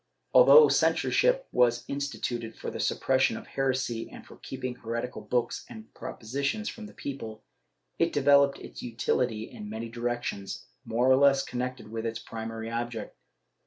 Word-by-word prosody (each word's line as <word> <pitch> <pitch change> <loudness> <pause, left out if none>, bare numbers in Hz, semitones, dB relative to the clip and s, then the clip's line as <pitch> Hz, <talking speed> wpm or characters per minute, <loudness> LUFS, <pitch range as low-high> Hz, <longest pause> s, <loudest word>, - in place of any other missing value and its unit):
Although 475 -2 +9
censorship - - +2
was 120 0 +3
instituted 125 -5 -3
for - - -5
the - - -6
suppression 130 -3 +2
of - - -9
heresy 130 -4 -1
and - - -12
for - - -14
keeping 125 -1 -5
heretical 115 0 -4
books 120 +3 -1
and 110 0 -11
propositions 140 - -3
from 220 -2 -8
the - - -14
people, 115 -6 -6 0.6
it 165 0 +3
developed 140 0 +4
its - - -10
utility 120 -1 -1
in 110 -2 -9
many 110 +2 -5
directions, 120 -4 -3 0.2
more 120 +3 +1
or 130 0 +6
less 135 0 +5
connected 125 -2 -4
with 115 0 -3
its 115 - -3
primary 115 0 -6
object. 115 -1 -4
120 Hz, 150 wpm, -28 LUFS, 115-135 Hz, 0.6 s, Although